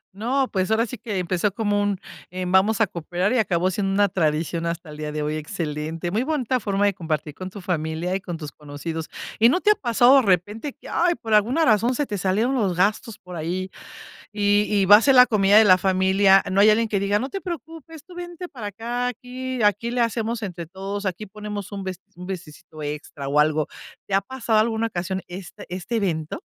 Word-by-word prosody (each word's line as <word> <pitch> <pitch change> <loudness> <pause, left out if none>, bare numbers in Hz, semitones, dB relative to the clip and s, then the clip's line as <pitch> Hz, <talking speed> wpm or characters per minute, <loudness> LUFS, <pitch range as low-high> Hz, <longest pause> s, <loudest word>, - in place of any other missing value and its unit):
No, 255 +6 0
pues, 185 -2 0
ahora 220 +1 +2
sí 245 -1 -8
que 215 -3 -4
empezó 185 +2 0
como 205 0 0
un: 205 -2 0 0.3
"Em, 180 0 -4
vamos 195 +3 +3
a - - +6
cooperar". 180 +3 -2
Y 255 - +2
acabó 185 -3 +1
siendo 195 +1 -1
una 200 0 +3
tradición 165 -1 -1
hasta 170 -1 -4
el 150 - -10
día 150 0 -4
de 150 0 -3
hoy, 150 +1 -2
excelente, 155 0 -4
muy 215 +5 +1
bonita 260 -3 0
forma 200 -2 0
de 200 - +2
compartir 155 -4 -3
con 185 +5 -7
tu 200 +1 -10
familia 170 0 -2
y 195 - -2
con 175 -2 -6
tus 150 -3 -7
conocidos. 155 +2 -6 0.3
¿Y 230 +2 +7
no 315 - +2
te 420 - +4
ha - - +4
pasado, 245 - +4
de - - +6
repente, 210 - 0
que, 295 - -15
ay, 345 0 +1
por 225 -7 -4
alguna 240 +10 +3
razón 230 +3 +3
se 290 - 0
te 205 -6 -4
salieron 205 +8 +1
los 205 -9 0
gastos 210 +4 0
por 180 -1 -11
ahí, 180 +4 -3 0.6
y 205 0 +3
y 200 -2 +2
va 205 +2 +9
a - - +1
ser 270 +2 +4
la 250 0 +9
comida 205 -3 +4
de 220 - +8
la 185 -2 +7
familia? 190 +1 +4
No 195 +1 +3
hay 210 - +7
alguien 225 +2 +3
que 200 - 0
diga: 200 +1 +1
"No 265 - -3
te 390 - -5
preocupes, 325 -2 -8
tú 360 - -14
vente 350 0 -7
para 230 -7 -7
acá, 235 +4 -3
aquí 250 0 -5
aquí 210 +3 +2
le 245 0 0
hacemos 230 0 -1
entre 175 -4 -6
todos, 195 +3 -5
aquí 190 +3 -4
ponemos 210 0 -7
un 200 -1 -5
best 185 -2 -5
un 180 +1 -9
bistecito 160 -3 -8
extra 145 -1 -6
o 145 +1 +2
algo". 155 0 +2 0.4
¿Te 200 - -5
ha 195 - +3
pasado 240 -4 0
alguna 225 +1 +1
ocasión 185 -1 -4
este 180 0 -9
este 185 +6 -4
evento? 170 - -2
200 Hz, 225 wpm, -23 LUFS, 175-230 Hz, 0.6 s, va